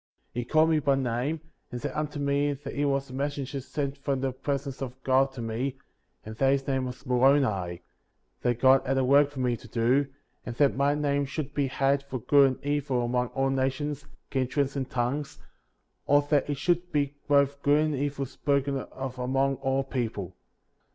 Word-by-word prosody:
33. 120 - -2
He - - -7
called 155 +5 +4
me 155 - +3
by 140 -1 +2
name, 135 +4 -1 0.3
and 125 - -4
said - - -3
unto 150 -1 -3
me 140 +1 +1
that 140 0 -8
he 145 - -1
was 135 -1 0
a - - -9
messenger 140 0 -3
sent 140 +1 -3
from 140 -2 -1
the 135 -1 0
presence 140 +1 -4
of 130 -1 -5
God 135 +1 +3
to 120 -3 -6
me, 125 +4 -2 0.5
and 110 0 -7
that 135 +1 +3
his 135 -1 -1
name 130 -1 0
was 125 +2 -9
Moroni; 125 -9 +2 0.6
that 120 -1 0
God 130 +1 +6
had 135 0 0
a 135 - +3
work 140 +2 +5
for 140 -2 -6
me 125 -1 +1
to - - -13
do; 125 +4 +2 0.4
and 120 - -6
that 140 +2 +3
my 140 +2 +2
name 145 -1 +1
should 145 +1 -5
be 140 -2 +1
had 135 +1 +1
for 140 -2 -5
good 140 +4 +5
and - - -19
evil 140 -4 0
among 125 +1 0
all 135 0 +1
nations, 135 +2 -2 0.2
kindreds, 135 +1 0
and 135 -2 -3
tongues, 130 +4 -2 0.7
or 145 0 +5
that 145 -1 +3
it 145 - -1
should 175 +3 0
be 145 -1 0
both 140 -1 +3
good 145 +1 +4
and 155 - -1
evil 140 0 -2
spoken 140 +1 0
of 130 -1 -7
among 135 +2 +1
all 135 0 0
people. 115 -8 -3
135 Hz, 200 wpm, -27 LUFS, 130-145 Hz, 0.7 s, God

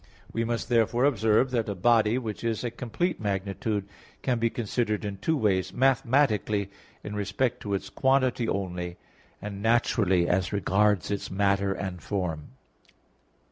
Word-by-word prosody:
We 115 - 0
must 115 0 -2
therefore 120 +1 +2
observe 115 -1 +3
that 115 -4 0
a 100 - -2
body, 110 +3 +3
which 115 -4 -5
is 115 -1 -1
a 120 - -2
complete 130 +10 -2
magnitude, 100 +1 -2 0.4
can 125 -3 +1
be 115 0 +2
considered 110 -2 -2
in 100 -1 -4
two 160 +10 0
ways; 95 -6 +1
mathematically, 120 -6 +2 0.3
in 105 - -6
respect 105 +5 -1
to 100 -1 -2
its 95 - -5
quantity 130 -3 +2
only; 90 -2 -3 0.5
and 100 -1 -6
naturally, 105 -6 +2
as 90 0 +1
regards 100 0 +2
its 100 - -3
matter 100 0 +1
and 95 -3 -4
form. 85 -5 -3
105 Hz, 145 wpm, -27 LUFS, 100-120 Hz, 0.5 s, observe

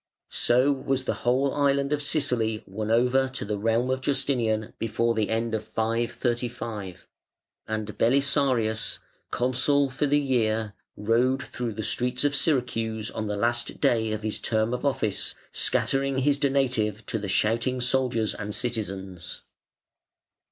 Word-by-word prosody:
So 125 +4 +3
was 135 -1 -1
the - - -1
whole 130 +3 +2
island 140 0 +2
of 145 - 0
Sicily 125 -8 +1
won 105 +3 -4
over 125 +3 +3
to 130 - -6
the 105 0 -2
realm 115 +4 +1
of 130 0 -1
Justinian 120 -6 0
before 115 +1 0
the 110 -2 0
end 115 +1 -1
of 110 -1 -1
535, 115 -2 -2 0.6
and 110 -1 -3
Belisarius, 125 -3 +2 0.3
Consul 130 +3 +2
for 145 +3 0
the 145 +1 +3
year, 110 -6 0 0.2
rode 120 +5 +2
through 120 -3 -4
the 110 +1 -4
streets 125 +4 0
of 145 -1 +2
Syracuse 115 -7 0
on 110 -1 -4
the 105 0 -2
last 120 +2 0
day 110 -2 +2
of 110 0 -3
his 110 -1 -2
term 110 +1 0
of 125 - -3
office, 130 -8 0 0.2
scattering 135 0 +1
his 140 +2 +2
"donative" 125 -7 0
to 110 - -2
the 100 -1 -5
shouting 115 +6 +1
soldiers 125 -3 +1
and 105 0 -4
citizens. 95 -7 -4
120 Hz, 145 wpm, -26 LUFS, 110-130 Hz, 0.6 s, So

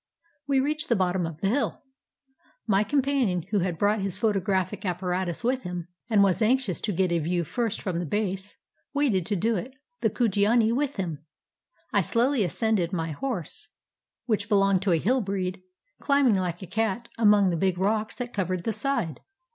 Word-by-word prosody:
We 275 -1 +3
reached 305 +4 -1
the 235 - +4
bottom 185 -3 +1
of 165 -1 -9
the 195 - +2
hill. 270 +7 -1 0.8
My 200 0 +3
companion, 260 - +1
who 205 - +2
had 175 -2 -1
brought 205 +3 +2
his 195 -1 -2
photographic 195 -2 0
apparatus 180 +1 -1
with 255 +2 +1
him, 180 -4 -6 0.2
and 210 -3 +5
was 195 0 +2
anxious 235 -4 +1
to 210 - -1
get 185 -1 +1
a 170 - +2
view 170 +2 0
first 230 +6 -2
from 180 -4 -2
the 175 - -2
base, 195 +2 -2 0.4
waited 230 - +1
to 210 - 0
do 225 +5 +1
it, 255 +8 -6 0.2
the - - +2
Kujiani 220 0 +2
with 285 +2 -1
him. 165 -6 -4 0.7
I - - +4
slowly 245 0 +2
ascended; 200 -1 0
my 165 -3 -2
horse, 185 - -4 0.6
which 220 -4 -1
belonged 195 -2 +3
to 195 -1 +1
a 170 - +4
hill 245 +10 +1
breed, 190 -2 -3 0.4
climbing 280 -5 +3
Hke 180 -1 -1
a - - -5
cat 220 +4 -1
among 205 -4 +5
the - - 0
big 185 +1 +1
rocks 215 +3 0
that 245 -1 -5
covered 185 -3 -1
the 225 - -1
side. 215 - -1
200 Hz, 180 wpm, -26 LUFS, 180-230 Hz, 0.8 s, and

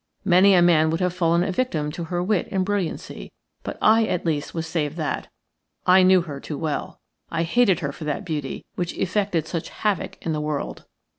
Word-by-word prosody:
Many 185 +2 +6
a 175 - +5
man 160 -2 +4
would 165 - -1
have 180 -1 0
fallen 170 -1 +2
a 190 - -1
victim 165 -10 -1
to 170 +2 -5
her 175 +1 -2
wit 200 -1 0
and 190 -1 0
brilliancy; 200 -4 -3 0.3
but - - -6
I 225 +1 +5
at 180 - -2
least 155 -3 -1
was 165 -1 -3
saved 160 -1 -2
that 155 -3 -2 0.3
– - - -51
I 190 - +7
knew 185 0 +6
her 145 -5 -7
too 150 +1 -6
well. 155 -1 -3 0.3
I 165 - -1
hated 185 0 +3
her 140 -3 -2
for 155 - -9
that 150 -1 -3
beauty, 150 -5 -4
which 175 -1 -3
effected 190 -4 0
such 165 -1 -4
havoc 210 -4 -2
in 165 - 0
the 150 - -2
world. 150 -1 -4
170 Hz, 210 wpm, -23 LUFS, 155-185 Hz, 0.3 s, I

